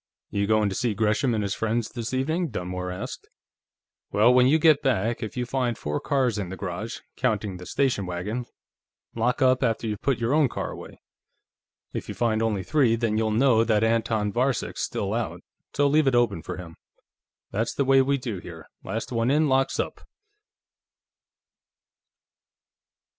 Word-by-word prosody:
"You 100 0 0
going 110 -1 +3
to 100 - -2
see 115 +1 -1
Gresham 110 +4 +1
and 105 - 0
his 100 - -1
friends, 110 +1 -1
this 115 -1 -5
evening?" 160 +6 0
Dunmore 90 +1 -4
asked. 90 - -7 0.8
"Well, 110 +4 +5
when 125 0 +6
you 150 +4 +5
get 155 -2 +5
back, 115 -2 0
if 110 +2 -5
you 125 - -1
find 120 -2 -1
four 75 0 -2
cars 130 -6 0
in 95 -3 -4
the 95 - -6
garage, 100 +5 -5 0.2
counting 105 -6 -1
the 90 - -10
station 125 -9 0
wagon, 105 +8 -4 0.7
lock 125 +3 +1
up 130 0 +4
after 115 -2 0
you've 105 -2 -3
put 135 -3 +1
your 120 +3 0
own 150 -3 +4
car - - -4
away. - - -10 0.9
If - - -5
you - - -5
find 115 -2 +1
only 105 -4 0
three, 135 -5 +3
then 115 -2 0
you'll 110 0 +1
know 115 +1 +4
that 110 -2 +2
Anton 110 -2 +1
Varcek's 125 0 0
still - - -2
out, - - -3 0.3
so 145 - +3
leave 150 +1 +3
it 130 - +3
open 115 -8 +2
for - - -6
him. 85 -3 -10 0.7
That's 115 +3 -1
the 140 - +1
way 135 0 +5
we 140 +1 +1
do 115 -7 -4
here; 80 -2 -10 0.2
last - - -4
one 115 0 +1
in 150 +2 +3
locks 135 0 +1
up." - - -3
115 Hz, 175 wpm, -25 LUFS, 105-130 Hz, 0.9 s, when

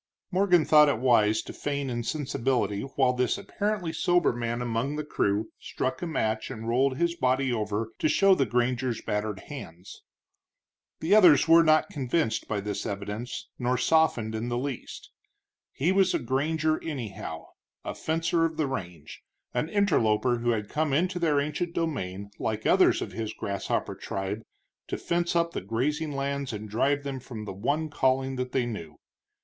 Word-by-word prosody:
Morgan 180 -3 +4
thought 150 -1 +7
it 140 - +1
wise 110 -3 +3
to - - -8
feign 140 -1 -3
insensibility 125 -3 -1
while 130 -2 +3
this 125 -1 0
apparently 200 -3 -2
sober 175 0 +2
man 120 0 -2
among 120 +4 -1
the 150 - -3
crew 105 -7 0
struck 130 0 -3
a 175 - -2
match 110 -8 -1
and 115 +1 -6
rolled 130 +3 +2
his 170 +1 +1
body 130 -2 +1
over 110 0 -2
to 155 - +2
show 195 +3 +5
the 135 -8 +2
granger's 120 +1 0
battered 105 -1 -2
hands. 95 - -10 1.0
The 165 +5 +2
others 170 -10 +7
were 165 +1 +8
not 155 -1 +3
convinced 130 -3 -1
by 105 -2 -2
this 105 0 -3
evidence, 105 +4 -5
nor 125 0 +1
softened 125 -5 +2
in 110 +2 -3
the 120 - -1
least. 135 0 -5 0.6
He 160 +7 +1
was 190 -1 +3
a - - +4
granger, 155 +5 0
anyhow, 110 - -6 0.4
a - - -3
fencer 165 +1 0
of 160 -1 -1
the 155 - +1
range, 90 - -6 0.3
an 125 +6 -1
interloper 125 - +2
who 120 +1 0
had 105 -3 0
come 150 +2 -1
into 180 +4 +1
their 155 -4 +2
ancient 150 +4 -2
domain 100 - -3
like 110 0 -2
others - - +4
of - - -7
his 110 -2 -4
grasshopper 100 -1 -2
tribe 100 +2 -4 0.5
to - - -3
fence 175 0 -1
up 170 0 +2
the - - -4
grazing 150 +7 -1
lands 140 -2 -2
and 105 0 -6
drive 140 +6 +1
them 135 -2 -4
from 115 -4 -8
the 100 - -5
one 145 +11 -1
calling 130 -1 +1
that 125 0 -3
they 125 -1 +1
knew. 85 -10 -6
130 Hz, 170 wpm, -27 LUFS, 110-155 Hz, 1.0 s, were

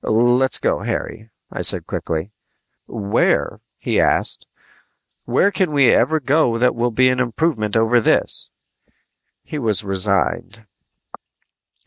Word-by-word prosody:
"Let's 120 +4 +2
go, - - -1
Harry," 110 +1 -5 0.2
I - - -5
said - - +1
quickly. 80 +5 -5 0.6
"Where?" 105 -3 -1 0.2
he - - -2
asked. - - 0 0.8
"Where 200 - +1
can 185 -5 -1
we 140 -3 +4
ever 160 0 +1
go 135 -4 +1
that 125 +2 +1
will 120 +1 -1
be 130 +3 +2
an 125 0 -1
improvement 120 -4 -1
over 115 +2 +2
this?" - - +1 0.9
He 150 - -7
was 110 -5 +2
resigned. 95 0 0
120 Hz, 120 wpm, -19 LUFS, 105-130 Hz, 0.9 s, we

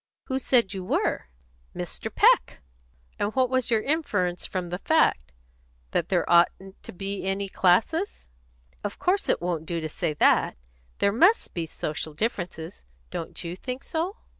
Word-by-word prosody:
"Who 265 0 -2
said 240 -6 +2
you 190 -1 -5
were?" 180 - 0 0.5
"Mr. - - -5
Peck." - - +3 0.6
"And 205 +3 -1
what 260 -1 +2
was 255 -2 +1
your 225 -2 +2
inference 205 - 0
from 180 -2 -3
the 180 +1 -4
fact? 130 - +2 0.6
That - - 0
there - - +1
oughtn't 185 +3 +2
to - - -9
be 195 +2 -4
any 195 +1 -1
classes?" 220 - +1 0.6
"Of 205 -1 -4
course 385 +3 +1
it - - +1
won't 165 -3 -2
do 170 -1 -2
to 160 - -3
say 150 0 -2
that. - - +3 0.4
There 200 - +3
must 360 - +4
be 165 -2 -3
social 155 0 -4
differences. 175 - -3 0.3
Don't 165 - -6
you 170 +1 -5
think 255 +7 -6
so?" 345 +6 -3
195 Hz, 160 wpm, -26 LUFS, 175-255 Hz, 0.6 s, must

